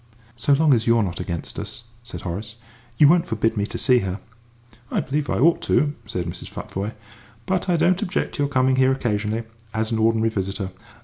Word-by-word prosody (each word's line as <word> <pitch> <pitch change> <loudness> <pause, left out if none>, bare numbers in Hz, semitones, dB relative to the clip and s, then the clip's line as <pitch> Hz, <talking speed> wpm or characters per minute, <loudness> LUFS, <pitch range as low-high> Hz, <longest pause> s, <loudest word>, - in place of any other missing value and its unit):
"So 130 +5 +2
long 150 0 +5
as 115 -2 +1
you 115 0 +5
are 115 - +3
not 90 -3 -4
against 85 -2 -4
us," 120 - -7 0.2
said 120 - -8
Horace, 105 +5 -5 0.4
"you 150 - +7
won't 175 +3 +4
forbid 115 0 0
me 105 -1 0
to - - -5
see 125 -2 +4
her?" 95 -1 -3 0.7
"I - - 0
believe 145 +1 -2
I - - +1
ought 165 +7 +4
to," 145 0 +3
said 90 -5 -3
Mrs. 85 +1 -6
Futvoye; 100 +4 -5 0.5
"but 185 0 -1
I 175 - +3
don't 175 +3 +3
object 180 - -1
to - - -3
your 140 - +1
coming 130 -1 +2
here 130 0 +4
occasionally, 110 -3 -1 0.3
as 110 0 -1
an 110 - 0
ordinary 115 0 +3
visitor. 95 -1 -3
115 Hz, 205 wpm, -23 LUFS, 105-140 Hz, 0.7 s, you